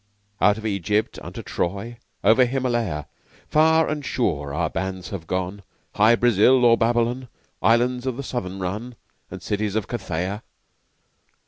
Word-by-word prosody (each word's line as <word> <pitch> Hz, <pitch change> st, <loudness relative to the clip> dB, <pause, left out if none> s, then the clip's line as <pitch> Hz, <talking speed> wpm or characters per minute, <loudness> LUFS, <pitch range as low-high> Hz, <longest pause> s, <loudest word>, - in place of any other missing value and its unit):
Out 105 Hz, 0 st, +4 dB
of 110 Hz, -, -8 dB
Egypt 105 Hz, +1 st, -1 dB
unto -, -, -8 dB
Troy 100 Hz, +7 st, -3 dB, 0.3 s
Over 125 Hz, +3 st, +6 dB
Himalaya 120 Hz, -, -1 dB, 0.5 s
Far 160 Hz, +1 st, +4 dB
and 150 Hz, -1 st, -3 dB
sure 75 Hz, -, -1 dB
our 80 Hz, +3 st, 0 dB
bands 95 Hz, +1 st, -4 dB
have 90 Hz, -5 st, -7 dB
gone 95 Hz, +2 st, -3 dB, 0.3 s
Hy 110 Hz, +3 st, +5 dB
Brasil 120 Hz, +2 st, +4 dB
or 115 Hz, -1 st, +7 dB
Babylon, 120 Hz, +2 st, 0 dB, 0.3 s
Islands 120 Hz, +4 st, +2 dB
of 125 Hz, -2 st, -2 dB
the 140 Hz, -, -4 dB
Southern 95 Hz, -8 st, -4 dB
Run, 105 Hz, +7 st, -4 dB, 0.3 s
And -, -, -9 dB
cities 105 Hz, 0 st, -2 dB
of 110 Hz, -3 st, -1 dB
Cathaia! 95 Hz, -2 st, -3 dB
110 Hz, 140 wpm, -23 LUFS, 95-120 Hz, 0.5 s, or